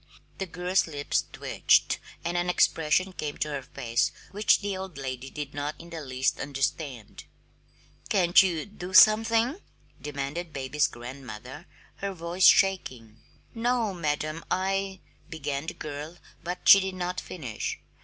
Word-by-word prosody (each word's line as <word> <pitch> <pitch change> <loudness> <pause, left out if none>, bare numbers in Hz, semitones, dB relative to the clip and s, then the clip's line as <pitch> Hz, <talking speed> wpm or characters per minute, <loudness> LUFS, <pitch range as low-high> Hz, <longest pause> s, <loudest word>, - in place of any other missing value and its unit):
The 195 - -2
girl's 180 +2 0
lips 145 -2 -1
twitched - - +2 0.3
and 170 +1 -1
an 175 0 0
expression 180 +2 +2
came 150 -3 -4
to 150 - -1
her 145 -2 -3
face 125 -3 -1 0.2
which 205 +2 +3
the 205 - -3
little 190 -1 -3
old 180 -6 -13
lady 130 -1 -5
did 145 -1 -6
not 145 +1 -3
in 170 0 -13
the 165 -1 -5
least 130 -1 -1
understand. 135 -3 -3 0.8
"Can't 180 -3 +6
you 175 -5 0
do 185 -2 -7
something?" 225 - +6 0.4
demanded 150 +3 -4
baby's 145 +2 +1
grandmother, 125 - -9 0.3
her 200 0 -3
voice 175 +1 +2
shaking. 125 - +2 0.3
"No, 230 -2 0
madam. 155 -1 -2
I 195 0 -1
" - - -32
began 145 -1 -4
the - - -4
girl, 150 +3 -7 0.3
but 180 +1 -5
she 200 - +11
did 190 -1 -3
not 180 0 -3
finish. 130 -11 -5
165 Hz, 145 wpm, -27 LUFS, 140-185 Hz, 0.8 s, she